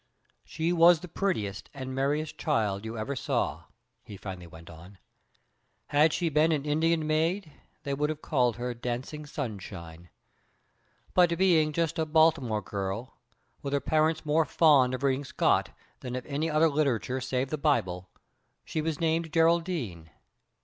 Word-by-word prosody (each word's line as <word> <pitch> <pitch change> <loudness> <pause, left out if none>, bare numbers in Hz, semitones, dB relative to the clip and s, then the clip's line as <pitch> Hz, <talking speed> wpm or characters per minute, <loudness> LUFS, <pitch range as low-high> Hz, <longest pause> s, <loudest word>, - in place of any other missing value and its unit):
"She 165 +2 -2
was 170 -1 +6
the 180 - -8
prettiest 135 - -2
and 130 -1 -5
merriest 145 +3 -1
child 110 -8 0
you 115 +1 -5
ever 135 +6 -3
saw," - - -2 0.4
he 100 - -10
finally 95 -3 -8
went 80 0 -14
on. 85 +4 -13 0.9
"Had 150 +2 +4
she 175 - -1
been 155 +1 +3
an 150 -2 -1
Indian 160 +2 +1
maid 160 +3 0 0.3
they 140 - -2
would 150 +2 0
have 155 -1 -5
called 125 -6 +1
her 125 +1 -3
'Dancing 125 +5 -5
Sunshine.' 95 - -7 1.0
But 175 -2 +4
being 165 -5 +4
just 165 +1 -1
a 160 - 0
Baltimore 150 -9 +3
girl, 100 +5 -5 0.4
with 140 - -4
her 140 - +2
parents 155 +3 +1
more 155 +2 +3
fond 140 -5 +4
of 130 - -7
reading 135 0 +1
Scott 135 - +1 0.3
than 125 -1 -6
of 125 - -5
any 150 +3 -2
other 155 +1 +4
literature 135 -4 0
save 130 +1 -2
the 155 - -2
Bible, 95 - 0 0.6
she 155 - -2
was 160 -1 -2
named 165 -1 0
Geraldine. 165 - +1
145 Hz, 155 wpm, -28 LUFS, 120-160 Hz, 1.0 s, was